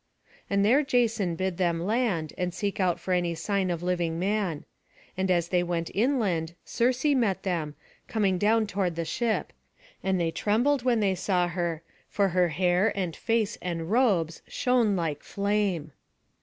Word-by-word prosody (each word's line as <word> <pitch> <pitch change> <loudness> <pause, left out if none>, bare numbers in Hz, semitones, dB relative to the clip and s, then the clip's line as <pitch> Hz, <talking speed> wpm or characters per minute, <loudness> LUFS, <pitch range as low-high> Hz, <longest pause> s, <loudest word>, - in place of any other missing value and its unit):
And 200 0 +2
there 255 +7 +5
Jason 230 - +1
bid 185 0 -2
them 170 -2 +1
land, 190 -5 0
and 180 -1 -3
seek 200 +1 -2
about 180 -3 +1
for 185 - -2
any 175 -2 0
sign 195 +2 -1
of 170 -1 -2
living 175 -2 -1
man. 190 -4 -1 0.5
And 190 0 -1
as 175 -2 +2
they 180 -1 +2
went 170 -1 -2
inland, 195 - 0
Circe 250 +4 0
met 245 -10 +2
them, 165 -6 -2 0.3
coming 195 -5 +1
down 220 +2 +3
toward 190 -4 -1
the 165 0 -2
ship; 225 +7 -1 0.5
and 190 -1 0
they 165 -1 0
trembled 240 - +1
when 240 -3 +2
they 195 -2 +2
saw 180 -1 +1
her; 170 -2 -2 0.3
for 200 -1 +1
her 180 0 +3
hair, 180 +5 +2
and 180 -5 -2
face, 225 -2 0
and 170 0 -4
robes, 195 -10 +2
shone 240 -5 +2
like 160 -5 -2
flame. 200 -6 -1
190 Hz, 165 wpm, -27 LUFS, 170-215 Hz, 0.5 s, there